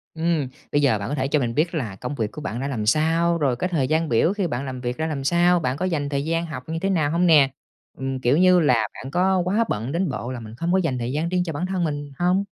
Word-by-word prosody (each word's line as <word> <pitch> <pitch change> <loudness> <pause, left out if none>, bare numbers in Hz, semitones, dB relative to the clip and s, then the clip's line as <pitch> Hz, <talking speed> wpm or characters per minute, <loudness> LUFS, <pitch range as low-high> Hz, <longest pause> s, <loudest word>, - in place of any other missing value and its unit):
Ừm. 160 -4 0 0.2
Bây 145 - +2
giờ 130 -7 +3
bạn 100 - -4
có 145 - -1
thể 135 -1 -1
cho 150 +1 +2
mình 115 -2 -2
biết 165 +3 +1
là 115 -10 -3
công 125 +7 -5
việc 110 -4 -2
của 150 - -8
bạn 120 -3 -4
ra 135 - -2
làm 110 -6 -3
sao, 165 +6 +2
rồi 135 -5 +1
cái 180 +8 -2
thời 145 -7 0
gian 160 +1 +1
biểu 120 - +3
khi 200 -4 -1
bạn 135 -1 -3
làm 130 -1 -6
việc 125 +1 -3
ra 160 0 -1
làm 140 -4 -3
sao, 175 +3 +3
bạn 130 -2 -2
có 185 - -1
dành 150 -6 -1
thời 140 0 -2
gian 165 +1 0
học 150 -6 -7
như 165 0 -2
thế 195 - 0
nào 155 -6 +1
hông 175 +2 +2
nè? 150 -5 +6 0.5
Ừm, 135 0 -3
kiểu 125 +4 +2
như 180 0 +5
là, 120 -9 +3
bạn 135 +2 -8
có 190 +1 +2
quá 210 +5 +2
bận 115 +6 -2
đến 175 0 0
bộ 125 -1 -4
là 125 - -5
mình 110 -1 -10
hông 170 +1 0
có - - +4
dành 160 -9 0
thời 120 +1 -3
gian 155 +4 -1
riêng 180 -1 +1
cho 165 -3 -4
bản 165 +5 -2
thân 185 -2 -1
mình 145 -2 -3
hông? 180 +3 +2
150 Hz, 300 wpm, -23 LUFS, 130-170 Hz, 0.5 s, nè